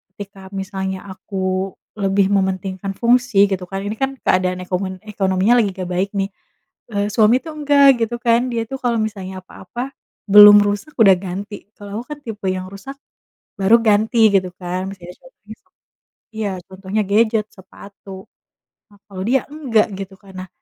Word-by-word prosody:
Ketika 200 -1 -10 0.2
misalnya 190 0 -4
aku 190 0 -3 0.3
lebih 195 -1 +1
mementingkan 190 0 -1
fungsi 235 -2 +3
gitu 185 -2 -3
kan. 195 +2 -5
Ini 205 +2 -4
kan 270 +2 -1
keadaan 185 0 +1
ekomen 185 0 -4
ekonominya 195 0 +1
lagi 220 -4 +2
nggak 185 -2 -6
baik 185 +2 -1
nih. 195 -1 -1 0.6
Eee, 205 0 0
suami 220 +3 +4
tuh 320 -2 -8
enggak 285 -1 +4 0.2
gitu 235 +1 -1
kan. 235 -1 +3
Dia 230 - -1
tuh 270 - -4
kalau 240 -1 +1
misalnya 190 -3 -5
apa-apa 245 +8 -8 0.4
belum 205 0 +10
rusak 205 +9 -3
udah 195 -3 +7
ganti, 195 +3 -6 0.2
kalau 205 +1 -7
aku - - -14
kan - - -19
tipe 215 -4 -7
yang 185 0 -5
rusak 200 +8 -9 0.7
baru 195 +4 +6
ganti 220 +1 +2 0.2
gitu 185 -1 +2
kan 180 +1 -4
masih 185 -3 -12
ada 180 - -9
so - - -19 0.2
besok - - -14 0.6
iya, 215 -2 -2 0.2
contohnya 190 +3 -3
gadget, 215 0 +2
sepatu. 195 0 -14 0.8
Nah 205 - -21
kalau 185 -1 -6
dia 260 +1 +2
enggak 255 -8 +1
gitu 195 0 -7
kan. 195 -1 -15
Nah - - -32
200 Hz, 165 wpm, -19 LUFS, 190-220 Hz, 0.8 s, belum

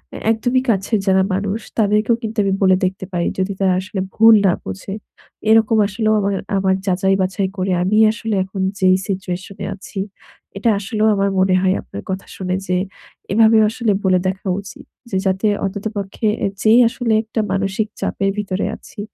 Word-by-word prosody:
এ - - -5
একদমই 245 +3 +1
কাছের 200 +2 0
যারা 190 0 +4
মানুষ 200 +3 -1 0.2
তাদেরকেও 215 +1 +2
কিন্তু 220 0 -5
আমি 195 -1 +1
বলে 190 -1 +5
দেখতে 190 +1 -3
পারি। 170 -1 0
যদি 190 +1 0
তারা 190 -1 +3
আসলে 190 +1 -5 0.2
ভুল 225 +1 +7
না 190 - +5
বুঝে। 95 - -6 0.6
এরকম 220 0 +4
আসলেও 215 +2 0
আমার, 200 -1 0 0.2
আমার 190 0 +2
যাচাই-বাছাই 190 0 +1
করে 185 0 -1
আমি 200 +4 +1
আসলে 220 -1 -3
এখন 190 0 -6 0.2
যেই 185 -1 +5
situation 185 0 -4
এ - - -2
আছি 195 0 -8 0.6
এটা 220 +4 +1
আসলেও 215 +2 0
আমার 200 0 +1
মনে 185 0 +3
হয় 190 0 +2
আপনার 100 - -9
কথা 190 +1 -3
শুনে 185 -1 -2
যে 180 - +1 0.6
এভাবেও 220 +1 +5
আসলে 225 0 -1
বলে 185 -1 +3
দেখা 190 +1 -4
উচিত। 275 +8 -12 0.2
যে 190 - -1
যাতে 190 +2 +1 0.2
অন্তত 195 +1 -5
পক্ষে 200 +2 -3 0.2
এ - - +2
যেই 225 +2 +5
আসলে 235 -1 -1
একটা 225 +1 -4
মানসিক 195 +3 -1
চাপের 195 - -1
ভিতরে 200 -2 -2
আছি, - - -15
195 Hz, 175 wpm, -19 LUFS, 190-220 Hz, 0.6 s, ভুল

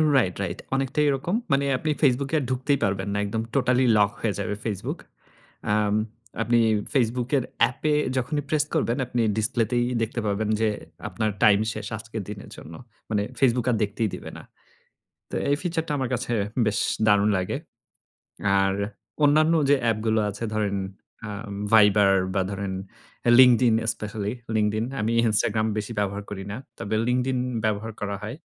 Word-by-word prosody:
Right, 105 -9 +2
right 90 -1 -4 0.2
অনেকটাই 135 +2 0
এরকম। 140 +8 -1 0.2
মানে 140 0 +3
আপনি 155 +4 -1
ফেসবুকে 140 +1 +2
আর - - -3
ঢুকতেই 130 +2 +1
পারবেন 95 0 0
না। - - -1
একদম 110 +2 -2
টোটালি 130 -1 +3
লক 100 -1 +4
হয়ে 110 -3 0
যাবে 105 +1 -2
ফেসবুক। 100 -4 -3 0.7
আম 105 -1 +2 0.5
আপনি 120 +1 +3 0.3
ফেসবুকের 125 +1 +1 0.2
অ্যাপে 150 +4 +2 0.2
যখনই 140 +4 -1
প্রেস 150 -1 +2
করবেন 120 +2 +1
আপনি 120 0 -1 0.2
ডিসপ্লেতেই 115 +2 +1 0.2
দেখতে 115 +2 -2
পাবেন 105 +1 -1
যে 110 - +3 0.4
আপনার 110 -1 -1
টাইম 100 -1 +6
শেষ 110 -2 -6
আজকের 110 0 -6
দিনের 105 -1 -8
জন্য। 80 - -11 0.4
মানে 105 -2 +1 0.2
ফেসবুক 125 -3 +3
আর - - +2
দেখতেই 105 +1 -1
দিবে - - -8
না। - - -11 0.9
তো - - -4
এই 145 - +4
ফিচার 170 -2 -1
টা - - -3
আমার 130 -2 -1
কাছে 120 0 -3 0.3
বেশ 105 -1 +1 0.3
দারুণ 105 0 +4
লাগে! 90 0 -2 1.0
আর 95 0 +2 0.5
অন্যান্য 155 +3 +5 0.2
যে 145 - +6
অ্যাপগুলো 110 -1 +1
আছে 105 +3 -8
ধরেন, 105 -2 0 0.5
আ - - -6 0.4
ভাইবার 105 -2 +6 0.2
বা 95 - +3
ধরেন 100 -1 -3 0.7
লিঙ্কডিন 125 -2 +6 0.2
স্পেশালি 105 0 -4 0.2
লিঙ্কডিন। 110 +1 +1 0.2
আমি 110 +2 0 0.2
ইনস্টাগ্রাম 110 +1 +1
বেশি 105 +2 -3
ব্যবহার 100 0 -2
করি 95 -1 -5
না। 105 - -4 0.2
তবে 100 +2 -2
লিঙ্কডিন 125 +1 +1 0.3
ব্যবহার 110 +1 -1
করা 100 -1 -2
হয়। 110 +4 -5
110 Hz, 155 wpm, -25 LUFS, 105-125 Hz, 1.0 s, টাইম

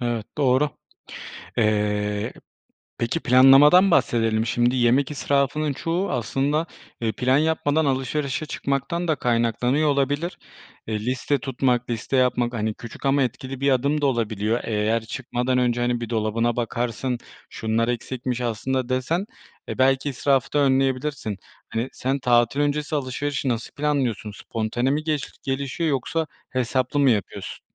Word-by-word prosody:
Evet, 120 -3 -2
doğru. 140 +1 +3 0.9
Eee, 105 -1 0 0.7
peki 120 +8 -1
planlamadan 140 +9 +7
bahsedelim. 115 -5 +2
Şimdi 120 +2 +1
yemek 125 +3 +3
israfının 145 +1 0
çoğu 170 +7 -2
aslında, 135 +6 0 0.3
eee, 115 -2 0
plan 130 +3 +2
yapmadan 160 0 +1
alışverişe 135 +1 -1
çıkmaktan 145 +5 -2
da 155 - +2
kaynaklanıyor 120 +4 +1
olabilir. 145 +4 0 0.5
Eee, 110 -1 -2
liste 130 +3 0
tutmak, 125 -1 0
liste 120 +3 -2
yapmak, 125 -1 +2
hani, 110 -1 -1
küçük 115 +5 -8
ama 140 +1 +3
etkili 130 +1 -4
bir 140 0 +3
adım 140 +3 +1
da 145 - +2
olabiliyor. 115 -3 0
Eğer 110 +1 0
çıkmadan 125 +1 -2
önce, 120 -1 +1
hani, 120 0 0
bir 115 -1 -5
dolabına 115 +1 0
bakarsın 120 +1 -2 0.3
şunlar 110 +1 -1
eksikmiş 125 0 -3
aslında 125 +2 -1
desen, 135 +9 -1 0.4
eee, - - -5
belki, 135 +2 +3
israfı 135 -1 +1
da 150 - +2
önleyebilirsin. 135 -4 +1 0.3
Hani, 115 +3 -2
sen 135 +2 -1
tatil 120 +1 +2
öncesi 150 +1 0
alışverişi 140 0 -2
nasıl 115 -2 -2
planlıyorsun? 135 -8 -1
Spontane 115 +4 -2
mi 150 +2 0
geliş 155 -3 -2
gelişiyor 140 +4 -2
yoksa 150 +4 -1 0.2
hesaplı 130 +2 0
mı 140 -2 +5
yapıyorsun? 105 -5 -3
130 Hz, 135 wpm, -23 LUFS, 120-140 Hz, 0.9 s, planlamadan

